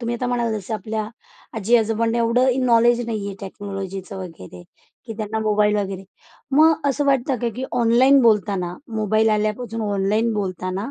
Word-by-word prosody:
तुम्ही 235 0 -2
आता 250 - -3
म्हणाला 240 -2 0
जसं 205 +3 -5
आपल्या 215 0 -4 0.5
आजी 225 +3 +3
आजोबांनी 225 +1 0
एवढं 250 +3 +2
नॉलेज 235 0 +4
नाही 215 -3 -3
आहे 200 - -5
टेक्नॉलॉजीचं 195 -1 -7
वगैरे 125 - -10 0.4
की 235 - -7
त्यांना 215 0 -3
मोबाईल 210 -1 +2
वगैरे, 195 -1 -3 0.5
मग 315 -1 +4
असं 280 +1 0
वाटतं 270 -1 +1
का, 240 - 0
की 260 - -3
ऑनलाईन 245 +3 +4
बोलताना 200 -6 +1 0.2
मोबाईल 215 +1 +2
आल्यापासून 215 +2 -1
ऑनलाईन 205 +4 +1
बोलताना 185 +2 -3
220 Hz, 155 wpm, -21 LUFS, 200-240 Hz, 0.5 s, नॉलेज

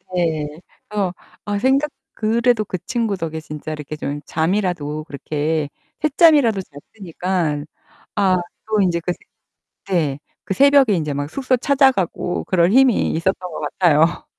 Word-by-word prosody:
네. 160 -4 0 0.4
그래서 200 -4 -1 0.3
아 205 -1 -1
생각 270 +5 +2 0.2
그래도 230 0 +1
그 185 - -3
친구 230 -5 -1
덕에 160 -2 -4
진짜 150 0 -7
이렇게 150 0 -6
좀 145 -1 -4
잠이라도 160 -3 -1
그렇게 150 +1 -2 0.3
샛잠이라도 290 - +4
잤으니까. 170 -1 -4 0.5
아 195 -3 +3 0.3
또 215 -1 +2
인제 175 -3 +2
그 175 +1 -2 0.5
새 195 - -10
네. 145 -6 +1 0.3
그 - - -1
새벽에 275 -1 +5
인제 155 -5 -1
막 145 +1 -3
숙소 255 - 0
찾아가고 255 - +1
그럴 175 -1 +3
힘이 260 -1 +4
있었던 170 +4 +1 0.2
것 - - -6
같아요. 160 +1 +2
185 Hz, 285 characters per minute, -20 LUFS, 155-225 Hz, 0.5 s, 새벽에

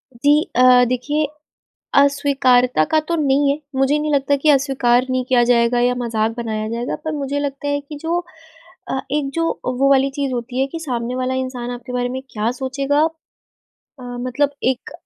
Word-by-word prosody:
जी 290 +5 +3
अ, 250 0 +6
देखिए, 290 +5 -1 0.7
अस्वीकारता 270 - +3
का 315 - +4
तो 340 - 0
नहीं 280 -2 +2
है, 285 - 0 0.2
मुझे 270 +3 +2
नहीं 300 0 -1
लगता 280 0 +2
कि 280 +3 -1
अस्वीकार 265 -3 +2
नहीं 255 0 0
किया 250 -2 +4
जाएगा 240 0 +3
या 245 +1 +2
मज़ाक 225 -2 -1
बनाया 220 -2 -3
जाएगा, 235 +2 -3
पर 315 - -2
मुझे 285 -1 -2
लगता 285 0 -4
है 285 0 0
कि 290 +1 -10
जो 335 +2 0 0.7
अ, 265 - -1
एक 290 -2 0
जो 330 0 0 0.2
वो 255 +2 +1
वाली 275 0 +4
चीज़ 280 -2 -1
होती 245 +1 -4
है 270 - +2
कि 330 - -4
सामने 245 -5 -3
वाला 255 0 -1
इंसान 255 -2 -4
आपके 245 0 -7
बारे 245 0 -1
में 260 +1 -4
क्या 215 +1 -1
सोचेगा? 275 +2 0 1.0
अ, - - -11
मतलब 250 +3 -2
एक 260 0 -1
260 Hz, 185 wpm, -19 LUFS, 245-285 Hz, 1.0 s, अ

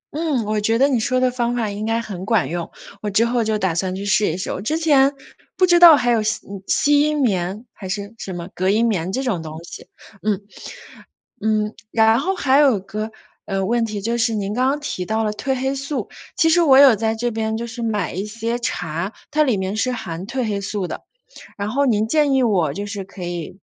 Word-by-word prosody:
嗯， 300 -8 0
我 215 0 -1
觉 225 +2 +2
得 275 +3 +4
你 250 -4 +1
说 255 +2 +1
的 255 0 +2
方 240 -1 -1
法 225 -4 -1
应 210 +2 -4
该 225 +1 +1
很 195 -5 -6
管 225 +2 +1
用， 170 0 -4 0.3
我 210 - -2
之 210 +3 +3
后 235 0 +1
就 215 -1 0
打 190 -4 0
算 185 +2 -2
去 195 +1 -5
试 205 -1 +2
一 170 - -4
试。 - - -4
我 185 - -4
之 300 +10 -1
前 285 -4 +4 0.5
不 370 - +5
知 350 -1 +4
道 340 -2 +10
还 245 -2 +1
有 230 - +2
吸 215 +1 0
嗯 195 -1 -8
吸 290 0 +3
音 300 0 +1
棉 200 -3 -1
还 190 - -9
是 200 +2 -4
什 190 - -6
么 175 -1 -6
隔 185 +1 0
音 220 +4 +3
棉 190 -5 -1
这 260 +5 -2
种 215 -10 -1
东 155 -1 -8
西， - - -11 0.3
嗯。 210 -2 0 1.0
嗯， 215 0 0 0.2
然 225 0 +4
后 380 +8 -1
还 270 -6 +3
有 270 -8 +4
个， 215 +3 -5 0.4
呃， 195 -1 -1
问 235 +2 +1
题， 210 -2 -5
就 230 +4 -1
是 235 -1 +1
您 200 -1 -2
刚 255 +3 +1
刚 275 +2 +1
提 185 -10 -4
到 220 +3 0
了 215 - 0
褪 265 +5 -2
黑 265 +1 -1
素， 275 +1 -4 0.3
其 325 - +3
实 345 +2 +4
我 275 -5 +6
有 270 -6 +7
在 220 +1 0
这 240 +2 -2
边 220 0 -2
就 230 +1 -3
是 235 0 -7
买 215 -5 -1
一 190 +3 -3
些 230 +3 -3
茶， 180 -3 -3 0.2
它 305 +1 +2
里 265 -7 +3
面 190 +2 -3
是 255 +3 0
含 185 -6 -6
褪 250 +2 -2
黑 205 -2 -1
素 200 -1 -3
的， - - -6 0.5
然 200 0 -3
后 280 +5 +1
您 220 -4 +2
建 295 +1 +2
议 265 - +3
我 185 - +2
就 200 +6 -4
是 200 -1 -5
可 190 0 -12
以， 175 +1 -6
220 Hz, 255 characters per minute, -21 LUFS, 200-255 Hz, 1.0 s, 道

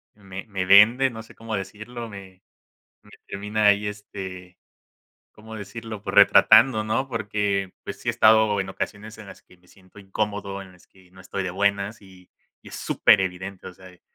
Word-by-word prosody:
me 95 -2 -10
me 95 -3 -3
venden, 115 +7 +6
no 110 0 -8
sé - - -18
cómo 115 -1 -6
decirlo, 110 +5 -7
me 95 -2 -12 0.6
me 105 - -21 0.2
termina 105 +2 -2
ahí, 105 0 +3
este, 95 -3 -8 0.7
¿cómo 110 +1 -13
decirlo?, 110 +1 -8
pues - - -5
retratando, 110 0 +6
¿no? 130 +5 -1
Porque, 100 -4 -2
pues, - - -8
sí - - -6
he - - +5
estado 110 -2 +4
en 95 - -4
ocasiones 105 +2 -6
en - - -11
las 95 - -13
que 90 - -22
me 90 0 -29
siento 95 +1 -20
incómodo, 100 0 -4
en 95 -1 -15
las 90 0 -22
que 95 -2 -24
no 95 0 -17
estoy 95 +1 -5
de 95 - -3
buenas, 100 +3 -1
y 95 -2 -18 0.3
y - - -13
es - - -9
súper - - +3
evidente, 95 +1 -5
o - - -8
sea 95 0 -15
eh 90 - -21
100 Hz, 190 wpm, -23 LUFS, 95-110 Hz, 0.7 s, venden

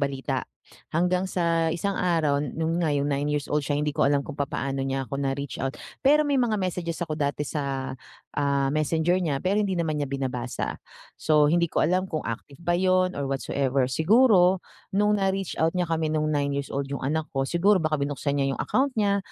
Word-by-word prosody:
balita. 135 -2 -2 0.5
Hanggang 180 +3 +2
sa 165 -2 +1
isang 195 +3 -2
araw, 160 -5 +2
non 160 +4 -2
nga 155 -4 +1
yung 145 +1 0
nine-years-old 145 +1 0
siya 145 - 0
hindi 150 +1 0
ko - - +1
alam 140 0 +2
kung 140 - -9
papaano 135 -1 -2
niya 135 0 -1
ako 140 - -3
na-reach 140 -1 -3
out. 135 +1 -2 0.3
Pero 300 +2 +6
may 285 -2 +1
mga 240 -3 +2
messages 180 -4 -2
ako 155 -2 -4
dati 145 0 -1
sa, 140 -2 -3 0.4
ah, 140 -1 +1
messenger 160 +4 +1
niya. 145 -6 -1
Pero 195 +3 +1
hindi 195 -3 0
naman 160 -3 -1
niya 145 - -1
binabasa. 130 -3 -3 0.4
So, 150 -1 +4
hindi 170 +1 +3
ko - - 0
alam 185 +4 +2
kung 155 -4 -3
active 140 +7 -7
ba 175 0 +1
yun 185 -2 +2
or 140 - -1
whatsoever. 135 -1 0
Siguro, 190 - +4 0.3
nung 210 +1 +3
na-reach 195 -1 -1
out 165 +2 +2
niya 180 -1 +1
kami 160 -1 0
nung 155 0 +1
nine-years-old 140 -1 -1
yung - - -5
anak 155 +3 -1
ko. 135 - +1
Siguro 175 +7 +2
baka 155 -1 0
binuksan 140 0 -1
niya 135 -1 +1
yung - - -6
account 270 0 +1
niya 200 -2 +2
155 Hz, 195 wpm, -26 LUFS, 140-180 Hz, 0.5 s, Pero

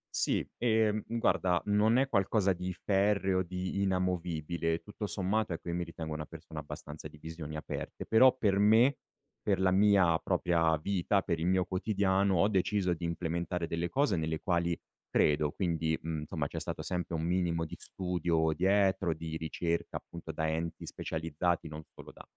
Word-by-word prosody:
Sì, - - +1
ehm, 110 -2 +2
guarda, 95 -6 +1
non 105 +3 +3
è 135 +1 +3
qualcosa 100 -4 +2
di 90 +1 -4
ferreo, 95 -1 +1
di 90 +2 -3
inamovibile, 85 -3 -1
tutto 105 0 -6
sommato, 100 0 0
ecco, 85 - -6
io 85 - -2
mi 90 - -1
ritengo 80 -2 -6
una 75 0 -4
persona 80 -1 -10
abbastanza 75 +1 -8
di 75 - -15
visioni 80 0 -7
aperte. 75 - -5
Però 130 +3 +6
per 100 -5 +2
me, 115 +6 +5 0.4
per 100 -3 +1
la 95 0 +3
mia 95 -4 +4
propria 80 -2 +2
vita, 95 +4 0
per 85 - -1
il 85 - 0
mio 95 0 +3
quotidiano 95 0 +1
ho 100 - +4
deciso 95 -1 +1
di 85 0 -4
implementare 85 +1 -2
delle 85 +1 -2
cose 135 -5 +1
nelle 80 0 -1
quali 85 -2 0 0.3
credo 75 0 +2
quindi, 80 -3 0
mhmm, 80 -1 -3
insomma, - - -3
c'è - - -5
stato - - -4
sempre 90 -1 -3
un 80 - -1
minimo 85 -1 0
di 80 - -7
studio 85 -3 0
dietro, 95 -1 +2
di 80 0 -5
ricerca 85 +1 -2
appunto - - -8
da 80 - -2
enti 80 +1 -3
specializzati, 80 +1 -2
non 75 0 -7
solo - - -11
da - - -12
90 Hz, 170 wpm, -31 LUFS, 80-100 Hz, 0.4 s, Però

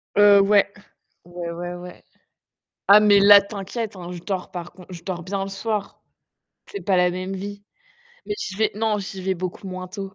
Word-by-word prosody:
Heu 205 -1 +7
ouais. 200 0 +4 0.6
Ouais, 175 -1 -6
ouais, 175 +1 -5
ouais. 180 0 -11 0.8
Ah, 205 +1 +9
mais 205 -1 +5
là, 200 0 +9
t'inquiète, 205 +2 -6
hein, 175 -1 -8
je 175 - -7
dors 190 -2 -4
par 175 -1 -7
contre 180 0 -15
je 170 -1 -10
dors 175 -3 -5
bien 195 +1 -3
le 195 - -6
soir. 205 +1 -4 0.7
C'est 405 - -6
pas 190 -3 +1
la 180 0 +4
même 185 +2 -4
vie. 200 +1 -7 0.6
Mais 415 - -2
je 190 - -5
vais 220 0 +2
non, 215 -1 0
j'y 195 -1 -7
vais 190 0 0
beaucoup 185 +2 -6
moins 185 -1 -6
tôt. 195 0 -7
195 Hz, 195 wpm, -23 LUFS, 180-205 Hz, 0.8 s, Ah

